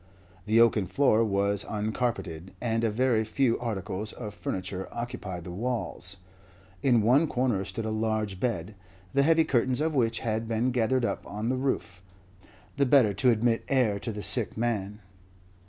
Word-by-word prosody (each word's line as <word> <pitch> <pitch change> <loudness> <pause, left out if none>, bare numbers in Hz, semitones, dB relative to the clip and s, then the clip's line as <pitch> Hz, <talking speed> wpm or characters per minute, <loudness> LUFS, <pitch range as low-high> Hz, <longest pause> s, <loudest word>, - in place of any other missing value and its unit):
The 110 +2 +4
oaken 110 -4 +4
floor 115 +2 +3
was 100 -1 +1
uncarpeted, 105 -5 -3
and 115 -1 -1
a 115 - +2
very 115 0 +1
few 115 +2 +1
articles 105 -3 -4
of 105 -4 -7
furniture 95 -1 -4
occupied 120 -7 -5
the 90 - -7
walls. 105 -2 -3 0.6
In 120 -5 +3
one 135 +8 +4
corner 125 -8 0
stood 110 +3 -4
a 110 - -2
large 110 -3 -1
bed, 115 -2 -2 0.4
the 140 - +4
heavy 160 +3 +4
curtains 130 -2 +1
of 155 +1 0
which 115 -4 +1
had 110 0 -2
been 115 +3 0
gathered 125 +1 +1
up - - -3
on 105 +3 -3
the 130 - +1
roof, 130 -8 -2 0.8
the 140 - +3
better 125 -6 +5
to 100 +6 +3
admit 115 0 +2
air 120 -7 +2
to 115 - -4
the 105 -1 -6
sick 120 -4 +4
man. 105 -3 -2
115 Hz, 165 wpm, -28 LUFS, 105-125 Hz, 0.8 s, better